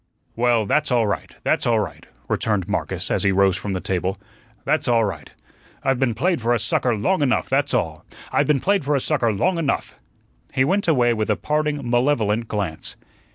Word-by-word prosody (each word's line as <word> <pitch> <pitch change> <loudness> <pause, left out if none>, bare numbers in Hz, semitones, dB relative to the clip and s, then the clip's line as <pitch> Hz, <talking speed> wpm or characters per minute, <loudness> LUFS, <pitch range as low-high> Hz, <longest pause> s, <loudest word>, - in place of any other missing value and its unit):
"Well, 120 -2 +2
that's 150 +9 +1
all 120 -2 +3
right, 100 - -3
that's - - +1
all - - +3
right," - - -5 0.2
returned 105 -5 0
Marcus 95 -3 -2
as - - +1
he 100 - +3
rose 95 -1 +3
from 100 0 -4
the 95 - -1
table. 95 +1 -2 0.5
"That's - - +1
all 115 -2 +3
right. 100 - -5 0.5
I've 135 -2 +1
been 125 -4 +1
played 175 -1 0
for 120 +2 +2
a - - 0
sucker 120 +2 +1
long 185 - +1
enough, 135 -3 +1
that's 140 +1 +1
all. 80 0 -2 0.3
I've - - +2
been 150 -3 +2
played 200 -3 +2
for 145 +1 +1
a - - +2
sucker 115 -2 +1
long 170 - 0
enough." 145 -4 -1 0.6
He 130 - +3
went 195 +6 +1
away 125 -7 +3
with 110 -1 -2
a 105 - +3
parting 150 -1 -1
malevolent 120 -3 +1
glance. 100 -8 -3
120 Hz, 200 wpm, -22 LUFS, 105-145 Hz, 0.6 s, all